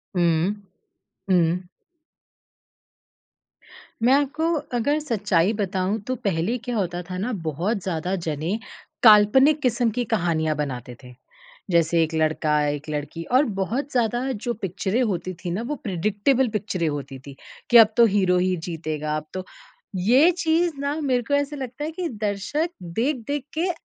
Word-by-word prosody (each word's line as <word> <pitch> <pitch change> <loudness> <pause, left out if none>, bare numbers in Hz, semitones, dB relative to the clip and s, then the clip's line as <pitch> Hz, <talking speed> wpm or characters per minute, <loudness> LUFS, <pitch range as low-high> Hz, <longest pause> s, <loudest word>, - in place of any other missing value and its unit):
हुँ। 170 +2 +2 0.8
हुँ। 175 0 +3 2.4
मैं 255 +3 +5
आपको 290 +3 +1 0.3
अगर 285 +6 +1
सच्चाई 210 - +1
बताऊँ 195 0 -1
तो 255 - -1
पहले 200 -1 -1
क्या 245 0 -5
होता 175 -4 -2
था 185 - -4
ना, 225 +7 -2
बहुत 180 +4 -2
ज़्यादा 180 +1 -2
जने 160 +6 -2 0.5
काल्पनिक 245 +8 +6
किस्म 240 -2 +2
की 245 - +2
कहानियाँ 160 -5 +1
बनाते 125 -4 -4
थे। 125 0 -12 0.6
जैसे 170 0 +3
एक 160 0 -3
लड़का, 155 -1 +1
एक 145 +1 -4
लड़की 150 +2 -4
और 270 +4 +5
बहुत 250 +10 -2
ज़्यादा 240 -1 +1
जो 240 +1 -3
पिक्चरें 195 +5 -1
होती 185 -4 -2
थीं 175 - -3
ना, 190 +6 -2
वो 295 +5 -3
प्रेडिक्टेबल 210 +7 +1
पिक्चरें 185 -5 -2
होती 140 -3 -4
थीं, 140 +1 -12 0.3
कि 240 - +8
अब 220 -1 +7
तो 235 - +8
हीरो 185 -3 +3
ही 185 +1 +1
जीतेगा, 155 -2 -3
अब 155 - -6
तो 185 0 -5 0.5
ये 250 - +5
चीज़ 335 0 +1
ना 280 +1 -1
मेरे 255 -4 +1
को 285 - -1
ऐसा 285 +1 -1
लगता 260 0 -6
है 310 - -3
कि 340 +1 -3
दर्शक 215 - -2
देख-देख 255 - -2
के 355 +3 +1
205 Hz, 150 wpm, -23 LUFS, 170-255 Hz, 2.4 s, कि